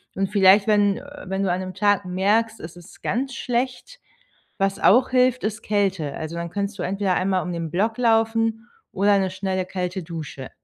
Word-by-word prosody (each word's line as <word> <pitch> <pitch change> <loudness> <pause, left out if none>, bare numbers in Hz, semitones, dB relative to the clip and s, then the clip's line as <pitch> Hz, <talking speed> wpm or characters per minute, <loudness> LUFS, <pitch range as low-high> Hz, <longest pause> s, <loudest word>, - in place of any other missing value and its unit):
Und 195 0 -1
vielleicht, 195 0 +5
wenn, 205 -2 +3
äh, - - -10 0.2
wenn 190 +1 -2
du 190 - 0
an 180 +1 -1
'nem 185 0 -6
Tag 205 +1 +2
merkst, 210 +5 +1
es 160 +2 -9
ist 175 +2 -15
ganz 260 +5 -1
schlecht, 255 - -3 0.6
was 195 0 0
auch 250 +5 +4
hilft, 255 0 +3
ist 215 0 -3
Kälte. 190 -8 -1
Also 160 +1 -6
dann 170 0 -4
könntest 200 +1 -4
du - - -2
entweder 195 0 0
einmal 185 0 0
um 180 - -4
den 165 -1 -4
Block 220 +6 0
laufen 225 0 +1 0.2
oder 200 +1 +3
'ne 190 -1 0
schnelle 185 0 -2
kalte 185 0 -4
Dusche. 155 -5 -7
195 Hz, 190 wpm, -23 LUFS, 185-225 Hz, 0.6 s, vielleicht